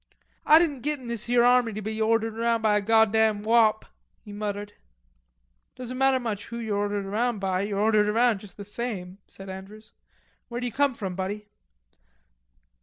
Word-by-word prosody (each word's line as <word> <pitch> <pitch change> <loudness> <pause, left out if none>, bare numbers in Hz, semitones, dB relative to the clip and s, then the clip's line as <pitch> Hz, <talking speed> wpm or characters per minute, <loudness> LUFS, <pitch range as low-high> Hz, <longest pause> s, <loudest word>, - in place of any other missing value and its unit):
"Ah 310 - +8
didn't 305 -6 +1
git 295 +1 -2
in 255 - -12
this 235 -1 -2
here 240 0 +4
army 245 -2 +4
to 215 - -5
be 220 +1 -4
ordered 225 0 +1
around 230 0 0
by 215 -1 +3
a 210 - +2
goddam 220 0 +3
wop," 220 -1 +3 0.4
he 205 - -10
muttered. 205 0 -5 1.0
"Doesn't 255 0 -6
matter 270 -1 +3
much 220 -5 -4
who 235 - -7
you're 220 -3 -2
ordered 205 -1 -2
around 225 +4 -1
by, 190 -1 -1
you're 200 0 -3
ordered 210 0 +3
around 230 -1 +2
just 195 -2 -14
the 205 - -8
same," 200 -4 -5
said 195 - -12
Andrews. 195 +3 -10 0.5
"Where 240 0 -5
d'ye 245 -1 -3
come 280 +1 +1
from, 195 -4 -4
buddy?" 195 +3 -4
220 Hz, 180 wpm, -26 LUFS, 205-235 Hz, 1.0 s, Ah